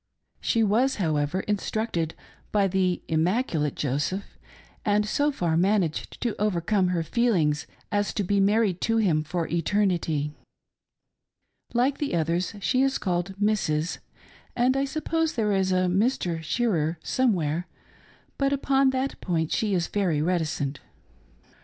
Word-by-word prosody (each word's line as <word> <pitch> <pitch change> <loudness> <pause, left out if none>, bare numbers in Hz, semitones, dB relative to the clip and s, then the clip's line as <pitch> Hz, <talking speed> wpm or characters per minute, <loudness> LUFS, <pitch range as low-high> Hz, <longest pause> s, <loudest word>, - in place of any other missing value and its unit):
She 230 - +1
was, 235 +6 +2
however, 155 -1 0
instructed 205 -5 -2 0.4
by 200 -2 +3
the 185 -1 0
immaculate 160 - 0
Joseph, 150 +8 -2 0.4
and 210 0 +2
so 290 +6 +1
far 175 - 0
managed 180 -2 0
to 235 -3 -1
overcome 195 -1 +1
her 175 -2 0
feelings 165 -9 +1 0.2
as 205 0 +1
to 205 - 0
be 200 +2 +1
married 200 -2 +2
to 225 0 +1
him 170 -9 +2
for 165 +1 -2
eternity^ 170 -5 0 1.4
Like 260 +4 +2
the 290 -11 -1
others 170 +5 0
she 255 +7 +2
is 270 0 +2
called 180 0 -2
" - - -19
Mrs.," 180 -7 0 0.6
and 250 +2 +3
I 275 0 +1
suppose 320 +2 -1
there 215 -3 0
is 190 -1 +1
a 185 0 +2
Mr. 180 -3 0
Shearer 165 -4 0
somewhere, 180 - 0 0.7
but 275 0 +2
upon 275 -1 +3
that 260 +1 -2
point 160 -4 -1
she 210 -3 +1
is 175 -2 +1
very 180 -7 0
reticent. 150 -4 -1
190 Hz, 135 wpm, -26 LUFS, 165-225 Hz, 1.4 s, by